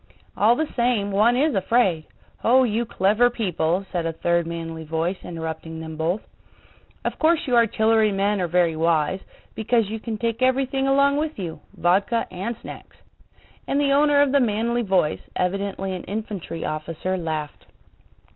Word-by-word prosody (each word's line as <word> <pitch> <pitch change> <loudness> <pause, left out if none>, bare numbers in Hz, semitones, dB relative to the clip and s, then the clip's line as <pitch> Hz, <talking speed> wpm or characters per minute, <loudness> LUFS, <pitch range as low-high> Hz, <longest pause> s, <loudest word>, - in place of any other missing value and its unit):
"All 225 +3 +4
the 315 +3 -3
same, 235 -5 +1
one 220 +5 +3
is 295 +2 +2
afraid! 190 -5 +1 0.4
Oh, 255 +3 +5
you 230 0 0
clever 215 +2 +3
people," 185 -5 -1
said 170 -3 -1
a - - -1
third 170 +1 0
manly 165 -1 -5
voice 165 +4 -2
interrupting 160 -1 -6
them 160 -1 -7
both. 165 +6 -1 0.8
"Of - - -3
course 325 +1 +3
you 250 - +1
artillery 220 -1 +3
men 200 0 0
are 175 - 0
very 170 -1 +2
wise, 160 +2 +1 0.3
because 225 -1 0
you 220 - -4
can 220 0 -4
take 230 +2 -2
everything 265 +1 +1
along 280 +1 +3
with 310 +1 -2
you—vodka 190 +4 -1
and 195 +6 -4
snacks." - - -11 0.7
And 280 - +1
the 285 -1 +2
owner 290 0 +5
of 280 - 0
the 280 - +4
manly 235 0 0
voice, 190 -8 +1
evidently 195 +1 -2
an 180 - -6
infantry 200 -5 -5
officer, 165 +4 -3
laughed. 155 -4 -4
200 Hz, 155 wpm, -23 LUFS, 170-240 Hz, 0.8 s, Oh